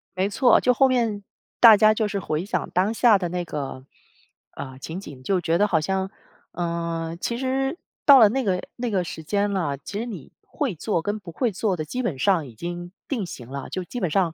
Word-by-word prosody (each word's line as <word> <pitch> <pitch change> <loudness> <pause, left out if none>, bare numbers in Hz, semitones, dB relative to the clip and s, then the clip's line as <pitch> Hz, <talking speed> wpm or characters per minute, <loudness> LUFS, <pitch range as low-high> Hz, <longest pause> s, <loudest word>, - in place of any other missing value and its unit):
没 190 +2 0
错， 245 +3 +4
就 250 - +3
后 270 +2 +4
面 230 -6 0 0.4
大 225 -3 +9
家 215 +1 +6
就 215 0 0
是 200 -1 -2
回 155 -3 -2
想 205 - -2
当 185 +4 +2
下 230 -2 +5
的 175 -2 -2
那 175 0 -3
个， 140 -4 -6 0.7
啊， 130 -2 -8
情 160 +6 -6
景。 145 -9 -10
就 190 +6 +1
觉 165 0 +1
得 210 - +4
好 170 -5 +2
像， 190 +4 -1 0.4
呃， 170 -1 -3
其 235 - -2
实 270 +3 -1 0.3
到 280 -2 +9
了 220 - +8
那 265 +4 -1
个 185 -4 +1 0.2
那 245 0 -2
个 190 -4 0
时 160 -2 -7
间 205 +5 0
了， 165 -8 -1
其 200 +9 -6
实 230 - -3
你 185 - -8
会 275 -8 -3
做 170 +2 -1
跟 205 +3 -2
不 185 -4 -10
会 235 +7 0
做 200 0 -1
的 155 - -3
基 250 +11 -3
本 185 - -2
上 170 -1 +2
已 120 - -13
经 175 +5 -6 0.2
定 245 -7 -2
型 120 -7 -9
了， 135 +1 -6
就 185 - -3
基 245 +7 -6
本 180 - 0
上 175 -1 +1
190 Hz, 245 characters per minute, -24 LUFS, 165-220 Hz, 0.7 s, 大